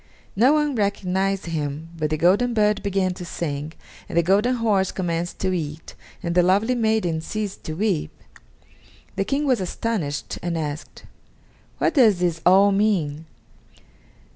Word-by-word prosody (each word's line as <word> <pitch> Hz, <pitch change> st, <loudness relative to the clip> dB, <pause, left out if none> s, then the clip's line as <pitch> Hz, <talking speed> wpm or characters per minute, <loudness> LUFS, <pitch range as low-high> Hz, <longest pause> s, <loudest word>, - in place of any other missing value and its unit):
No 245 Hz, +8 st, +5 dB
one 300 Hz, -1 st, +1 dB
recognized 195 Hz, -3 st, -1 dB
him, 155 Hz, -1 st, -4 dB
but 155 Hz, -2 st, -2 dB
the 155 Hz, -, -1 dB
golden 205 Hz, +9 st, +3 dB
bird 210 Hz, -1 st, +2 dB
began 195 Hz, -2 st, 0 dB
to 180 Hz, -, -8 dB
sing, 150 Hz, -3 st, -4 dB, 0.4 s
and -, -, -3 dB
the 170 Hz, -, +5 dB
golden 205 Hz, +8 st, +3 dB
horse 210 Hz, -5 st, +1 dB
commenced 175 Hz, -2 st, -3 dB
to 185 Hz, -1 st, 0 dB
eat, 155 Hz, -2 st, -5 dB, 0.3 s
and 170 Hz, -, -1 dB
the 180 Hz, -, +5 dB
lovely 200 Hz, +7 st, +2 dB
maiden 220 Hz, -9 st, 0 dB
ceased 210 Hz, +2 st, -5 dB
to 155 Hz, -, -4 dB
weep. 190 Hz, -4 st, 0 dB, 1.1 s
The -, -, -1 dB
King 285 Hz, +2 st, 0 dB
was 255 Hz, -7 st, +2 dB
astonished 180 Hz, -6 st, -3 dB
and 175 Hz, -1 st, -2 dB
asked: 150 Hz, 0 st, -5 dB, 0.7 s
"What -, -, +1 dB
does 225 Hz, -, +5 dB
this 175 Hz, -2 st, -1 dB
all 195 Hz, +2 st, +6 dB
mean?" 170 Hz, -7 st, 0 dB
185 Hz, 150 wpm, -23 LUFS, 165-215 Hz, 1.1 s, all